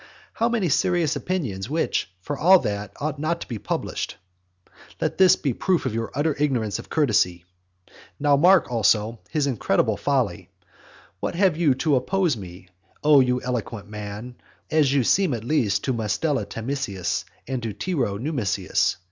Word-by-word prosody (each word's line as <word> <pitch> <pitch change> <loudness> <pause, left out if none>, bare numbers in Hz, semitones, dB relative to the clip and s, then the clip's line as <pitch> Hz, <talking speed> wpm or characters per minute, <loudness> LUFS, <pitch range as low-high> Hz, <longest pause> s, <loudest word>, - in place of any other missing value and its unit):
How 230 - +1
many 225 -6 0
serious 165 +1 +1
opinions, 120 - -3
which, 160 - -1
for 145 - -4
all 180 +7 +6
that, 100 -1 -3
ought 145 0 -3
not 170 +3 -1
to - - -6
be 115 -4 -5
published! - - -3 0.8
Let - - -2
this 185 -2 +7
be 140 - -1
a - - -4
proof 180 +7 0
of - - -1
your 115 0 -2
utter 145 +2 +1
ignorance 120 -9 0
of - - -10
courtesy. 100 - +1 0.7
Now 145 -1 +4
mark, 175 0 +5
also, 110 0 +2
his 150 -3 0
incredible 130 -7 +1
folly. - - -1 0.7
What - - -3
have 185 -2 +3
you 155 -5 +3
to 145 +1 +2
oppose 180 +5 +1
to 115 - -5
me, 90 -1 -11 0.3
O 150 -1 +7
you 125 -1 +2
eloquent 115 -4 -4
man, 105 +3 -7 0.3
as 155 -4 +3
you 140 -2 +3
seem 180 - +2
at 110 - -6
least 120 -6 +1
to 130 - 0
Mustela 120 +6 -1
Tamisius, 115 -7 -3 0.2
and 130 -1 -3
to 115 -2 -3
Tiro 115 - -2
Numisius? 130 -4 0
130 Hz, 165 wpm, -24 LUFS, 110-155 Hz, 0.8 s, this